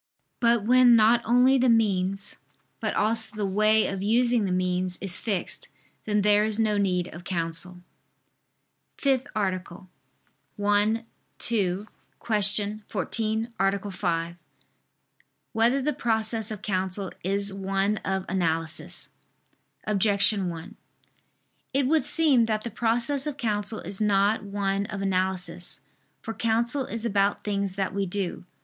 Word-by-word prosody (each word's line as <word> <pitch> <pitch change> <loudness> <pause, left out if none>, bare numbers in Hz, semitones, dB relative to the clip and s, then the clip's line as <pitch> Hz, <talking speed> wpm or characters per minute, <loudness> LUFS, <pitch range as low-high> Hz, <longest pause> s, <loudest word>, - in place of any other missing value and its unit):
But 235 -2 +3
when 245 +1 +6
not 230 +2 +5
only 250 +3 +4
the 250 0 +3
means, 195 -3 +1 0.4
but - - -2
also 225 +1 0
the 210 -1 -2
way 215 +3 +3
of 195 -1 -3
using 235 +2 +2
the 190 - -2
means, 180 0 -1
is 190 -2 +1
fixed, 200 -4 -3 0.4
then 210 -1 +1
there 210 0 +4
is 215 -1 0
no 215 -2 +1
need 180 -3 0
of 170 +2 -10
counsel. 170 0 -3
________________________ 180 - -16 1.2
FIFTH 270 -1 +1
ARTICLE 185 -2 -3 0.7
[I 205 +2 +2 0.4
II, 200 -4 +2 0.3
Q. 210 -1 +1
14, 220 +4 -1
Art. 195 +1 0
5] 170 -2 -2 1.2
Whether 235 +4 +2
the 300 +2 0
Process 220 -1 -1
of 215 -2 -7
Counsel 190 -1 -2
Is 200 +2 -1
One 195 +2 0
of 190 -2 -2
Analysis? 165 -3 -2 0.8
Objection 200 -1 +2
1: 175 +6 -8 1.0
It 275 -1 +3
would 310 +3 +2
seem 285 -8 +4
that 215 -1 -1
the 235 - -5
process 245 +6 +1
of 295 -2 -4
counsel 215 -3 -2
is 195 +4 -4
not 205 +1 +2
one 200 0 -2
of 195 -1 -5
analysis. 185 -2 -2 0.4
For 225 - -4
counsel 235 +4 0
is 230 0 -2
about 200 -2 +1
things 200 -2 -2
that 195 -1 -2
we 200 0 -1
do. 180 -1 -3
205 Hz, 135 wpm, -26 LUFS, 190-225 Hz, 1.2 s, when